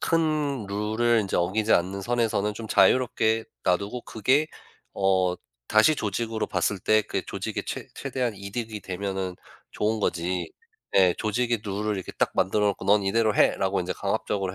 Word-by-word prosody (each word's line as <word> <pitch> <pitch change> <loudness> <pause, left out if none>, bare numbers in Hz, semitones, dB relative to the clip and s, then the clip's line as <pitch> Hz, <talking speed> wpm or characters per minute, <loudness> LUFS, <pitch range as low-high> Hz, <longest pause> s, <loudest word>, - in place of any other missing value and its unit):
큰 155 - 0
룰을 110 +3 +1
인제 100 - -2
어기지 105 +5 +1
않는 95 +3 +1
선에서는 110 -2 0
좀 110 +1 -7
자유롭게 110 +1 +3 0.2
놔두고 100 +7 0
그게 130 +8 +1 0.5
어 95 -2 +2 0.3
다시 110 +9 +5
조직으로 110 +1 -2
봤을 100 - 0
때 110 +3 +3
그게 105 - -3
조직에 - - -4
최 - - -5
최대한 125 -3 -2
이득이 105 +3 -5
되면은 95 -1 -4 0.4
좋은 110 +1 0
거지 90 -2 -1 0.4
네 90 -2 +5
조직의 115 +1 0
룰을 105 +1 -2
이렇게 95 - -6
딱 - - +2
만들어 105 +3 +2
놓고 100 - -1
"넌 105 +1 +4
이대로 110 +2 +2
해."라고 95 0 +2
인제 90 - -2
강압적으로 95 -3 -2
105 Hz, 340 characters per minute, -26 LUFS, 95-115 Hz, 0.5 s, 다시